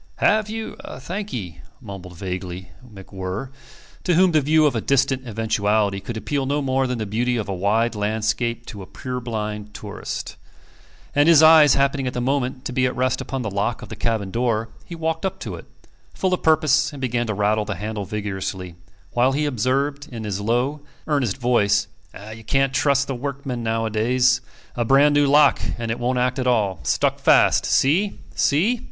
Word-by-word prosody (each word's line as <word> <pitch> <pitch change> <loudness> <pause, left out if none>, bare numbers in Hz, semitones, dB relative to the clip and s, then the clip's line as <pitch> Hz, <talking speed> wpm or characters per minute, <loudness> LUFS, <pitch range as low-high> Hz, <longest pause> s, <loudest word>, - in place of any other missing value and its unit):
"Have 215 0 +2
you? 220 0 -5 0.2
Thank 200 +3 -5
'ee," 90 -9 -6 0.2
mumbled 90 -3 -10
vaguely 90 0 -6
MacWhirr, 95 +1 -7 0.5
to 180 - +2
whom 185 +1 +5
the 155 -2 +3
view 155 +2 +3
of 145 - +2
a 115 - 0
distant 135 0 +1
eventuality 105 -2 0
could 115 +3 -6
appeal 135 +4 -2
no 145 +2 0
more 135 -1 0
than 125 -1 -2
the 110 - -3
beauty 120 +4 0
of 110 - -3
a 100 - -2
wide 105 +6 +1
landscape 110 +3 -1
to 105 - -9
a 95 - -10
purblind 110 -5 -5
tourist; 105 -1 -6 0.8
and 145 +3 +4
his 160 -2 +7
eyes 155 -2 +8
happening 140 -1 +1
at 125 - -3
the - - -1
moment 130 0 -1
to - - -3
be 130 0 +2
at 125 - -4
rest 130 0 0
upon 135 -2 -4
the 105 - -3
lock 100 +4 -2
of - - -10
the - - -6
cabin 110 -5 -2
door, 115 -1 0 0.2
he 170 - -8
walked 160 +1 -2
up 190 - -2
to - - -5
it, - - -9 0.5
full 185 -1 0
of 180 - -1
purpose, 155 -2 +3
and 145 - -9
began 120 -2 -1
to 110 - -2
rattle 105 +1 +1
the 105 -1 -3
handle 105 +2 -4
vigorously, 95 -3 -4 0.4
while 125 +2 +2
he 150 +2 0
observed, 140 +3 -1
in 115 -2 -6
his 100 -2 -3
low, 125 +7 0 0.2
earnest 140 -9 0
voice, 105 -5 +2 0.5
"You 115 0 -11
can't 135 +3 +1
trust 140 0 +2
the 135 - -3
workmen 135 -1 -4
nowadays. 115 +3 +1 0.3
A 120 - 0
brand 140 +5 +4
new 145 -1 +4
lock, 145 0 +5 0.2
and 115 -1 -3
it 115 - -3
won't 125 +1 0
act 125 +1 0
at 125 - -1
all. 105 -8 +1
Stuck 65 - 0
fast. - - +4
See? 180 +10 +2 0.2
See?" 200 +12 +2
125 Hz, 190 wpm, -22 LUFS, 105-140 Hz, 0.8 s, eyes